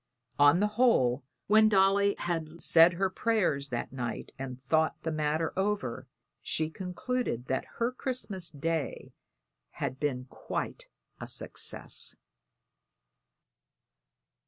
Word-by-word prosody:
On 145 +5 +6
the - - +4 0.2
whole, 130 - +4 0.2
when 215 +1 +6
Dolly 200 0 +4
had 165 -1 -3
said 170 +1 +6
her 190 +3 +1
prayers 185 -9 0
that 120 +1 -3
night 120 -3 -4
and 130 -2 -5
thought 160 +2 +2
the 160 - -1
matter 155 +1 0
over, 195 - -1 0.3
she 155 0 -1
concluded 180 - -3
that 130 - -1
her 235 +1 +1
Christmas 240 - -4
Day 160 0 -3 0.6
had 130 - -3
been 130 -4 -1
quite - - -5 0.3
a - - -6
success. - - -4
165 Hz, 110 wpm, -30 LUFS, 140-200 Hz, 0.6 s, On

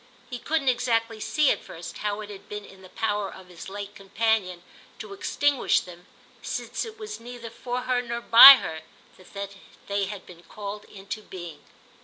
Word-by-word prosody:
He 245 - -5
couldn't 305 +1 -1
exactly 230 -3 +1
see 300 +6 +2
at - - -3
first 170 +1 -9
how 210 0 -2
it 210 -1 -8
had 195 -1 -12
been 210 0 -6
in 190 0 -16
the 185 - -14
power 205 -2 -2
of 185 -1 -13
his 175 +1 -10
late 205 +1 -7
companion 195 -3 -1 0.3
to 210 -2 -8
extinguish 285 +7 +1
them, 180 0 -13 0.3
since - - -4
it 440 -1 -10
was 430 -1 -7
neither 235 -1 -9
for 245 +1 -4
her 250 0 0
nor 235 -1 -4
by 235 +4 +11
her 160 -10 -5 0.4
that 200 +2 -8 0.3
they 200 0 -1
had 200 0 -8
been 170 -1 -14
called 205 +4 -8
into 200 +1 -8
being. 175 -7 -10
210 Hz, 180 wpm, -26 LUFS, 190-240 Hz, 0.4 s, by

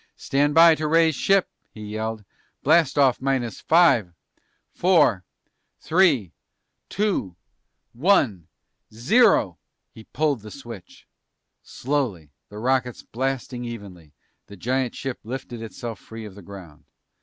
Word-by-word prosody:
"Stand 145 +2 0
by 165 0 +8
to 155 -1 -2
raise 165 +1 +3
ship!" 195 +7 +2 0.2
he 110 - -13
yelled. 110 0 -5 0.4
"Blast 160 0 +3
off 135 -4 +3
minus 130 -3 -2
five 145 - +3 0.6
four 150 - +3 0.6
three 155 - +2 0.6
two 195 - -1 0.6
one 120 - +1 0.4
zero!" 120 - +3 0.3
He 110 - -14
pulled 150 -6 -1
the 105 - -10
switch. 115 -7 -12 0.6
Slowly, 120 - -3 0.2
the 105 - -11
rockets 125 +1 -1
blasting 130 0 -4
evenly, 100 -10 -9 0.4
the 100 - -12
giant 125 +5 -2
ship 135 -2 -5
lifted 120 0 -7
itself 115 -1 -7
free 115 +3 -10
of 105 - -10
the 100 - -13
ground. 90 -5 -13
120 Hz, 120 wpm, -23 LUFS, 105-145 Hz, 0.6 s, by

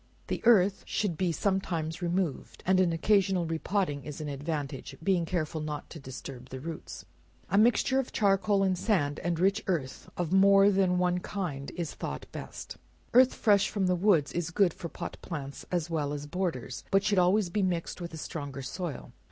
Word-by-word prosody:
The - - -2
earth 200 -4 +5
should 200 -6 -1
be 180 +1 0
sometimes 170 -2 -1
removed, 175 -3 -2
and 185 0 +4
an 180 -2 +3
occasional 190 +1 +2
re 160 0 -2
potting, 175 -9 -1
is 150 +2 -7
an 150 -1 -4
advantage; 145 -1 -4
being 185 -3 +2
careful 160 -2 -2
not 150 -1 -5
to 165 - -8
disturb 130 -1 -9
the 130 - -6
roots. 160 +3 -7 0.5
A 195 - +3
mixture 245 +4 +4
of 265 - -3
charcoal 200 -1 +2
and 190 -1 +2
sand, 160 -8 0
and 175 -1 -1
rich 195 +4 +2
earth 155 -9 -2
of 175 -1 -1
more 195 +1 +6
than 190 -2 +2
one 180 0 +2
kind 165 -8 -4
is 170 -4 -3
thought - - -5
best. - - -8 0.4
Earth 255 +1 +6
fresh 200 -2 +3
from 200 -3 0
the 180 0 +2
woods 175 -6 +3
is 170 -2 -2
good 180 0 +3
for 170 - -7
pot - - -6
plants, 140 -5 -6
as 175 -2 -1
well 145 -3 -1
as 145 0 -5
borders, 145 -7 -3
but 195 0 +3
should 205 -2 +2
always 180 +1 +3
be 210 - 0
mixed 180 -1 -2
with 170 - -5
a 160 - -7
stronger 145 -4 -6
soil. 165 +3 -5
175 Hz, 190 wpm, -29 LUFS, 155-195 Hz, 0.5 s, more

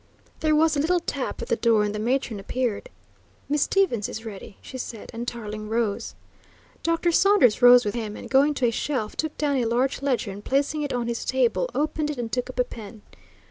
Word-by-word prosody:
There 310 -1 +2
was 315 0 +3
a - - 0
little 350 +5 +2
tap 280 -5 -4
at - - -7
the - - +2
door 230 -2 +3
and 210 0 -1
the 210 - -4
matron 240 -1 -1
appeared. 245 - -2 0.6
"Miss 295 0 0
Stevens 310 - +1
is 220 - -7
ready," 200 -2 -9
she 260 - -9
said, 230 -3 -7
and 235 +1 -5
Tarling 215 -3 -5
rose. 225 -2 -1 0.7
Dr. 335 +1 +1
Saunders 340 - +4
rose 245 -1 +8
with 205 - -1
him, 220 -3 -4
and, - - -8
going 280 +2 +3
to 260 - +1
a 235 - +3
shelf 230 -3 -2
took 315 -1 -3
down 285 -2 +1
a 245 - +1
large 250 +4 0
ledger, 255 -7 0
and 200 +2 -9
placing 285 +3 0
it 290 - -2
on 245 -1 -1
his 235 0 -3
table, 260 - +1
opened 305 0 -1
it 295 - -4
and 235 -2 -4
took 250 0 -2
up 255 - -8
a - - +5
pen. 220 -3 -11
250 Hz, 220 wpm, -25 LUFS, 225-290 Hz, 0.7 s, rose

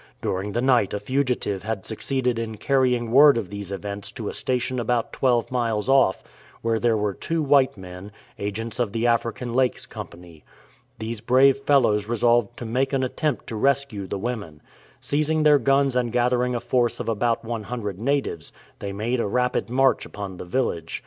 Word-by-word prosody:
During 100 +2 -3
the 120 - 0
night 125 -7 +3
a - - -2
fugitive 125 -4 -1
had 110 -1 -4
succeeded 125 +1 -1
in 110 -1 -4
carrying 125 -1 +1
word 140 +1 +7
of 100 -5 -4
these 100 -1 -6
events 100 0 -5
to 110 -3 -5
a - - -6
station 125 0 -1
about 120 0 -1
twelve 125 -3 +1
miles 115 -4 -1
off, 135 -8 +3 0.4
where 115 -1 +1
there 115 -1 +2
were 105 -1 -1
two 165 +7 -2
white 140 -4 +3
men, 90 +2 -10 0.3
agents 110 +3 -4
of 115 -5 0
the 115 +1 -1
African 115 0 0
Lakes 130 0 +1
Company. 85 -3 -11 0.5
These 110 0 -5
brave 130 +3 +5
fellows 125 -7 +2
resolved 120 0 +2
to 120 - -6
make 130 +5 -1
an 135 -1 +1
attempt 150 +4 -2
to 115 - -6
rescue 135 -4 0
the 100 - -3
women. 100 -9 -5 0.4
Seizing 155 +2 0
their 150 -1 +6
guns 135 -1 +2
and 120 -2 0
gathering 125 +1 +1
a - - 0
force 120 0 0
of - - -4
about 115 +1 0
100 110 -3 -4
natives, 135 - -1 0.3
they 100 - -4
made 115 +5 -2
a 115 - 0
rapid 125 +3 0
march 135 +2 +2
upon 100 -3 -7
the - - -7
village. 90 -6 -2
120 Hz, 180 wpm, -24 LUFS, 105-130 Hz, 0.5 s, word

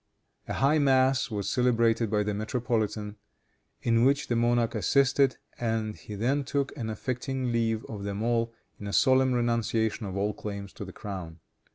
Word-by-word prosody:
A - - -3
high 145 +3 +3
mass 130 -1 +3
was 105 -3 -3
celebrated 115 -2 +2
by 105 0 +1
the 105 0 -2
metropolitan, 110 -1 -2 0.7
in 115 0 +3
which 140 +3 +2
the 120 - +1
monarch 120 0 +2
assisted, 135 +4 +3 0.2
and 110 -2 -1
he 105 - -9
then 130 +7 +1
took 140 0 -2
an 115 -6 -4
affecting 130 +3 -3
leave 115 -1 0
of 105 -3 -7
them 100 +1 -3
all, 115 0 +1 0.3
in 100 - -6
a 100 - -4
solemn 130 0 +4
renunciation 115 -3 0
of 95 0 -5
all 105 +1 0
claims 100 -2 -6
to 100 - -7
the 95 - -9
crown. 90 -5 -7
115 Hz, 170 wpm, -28 LUFS, 105-130 Hz, 0.7 s, solemn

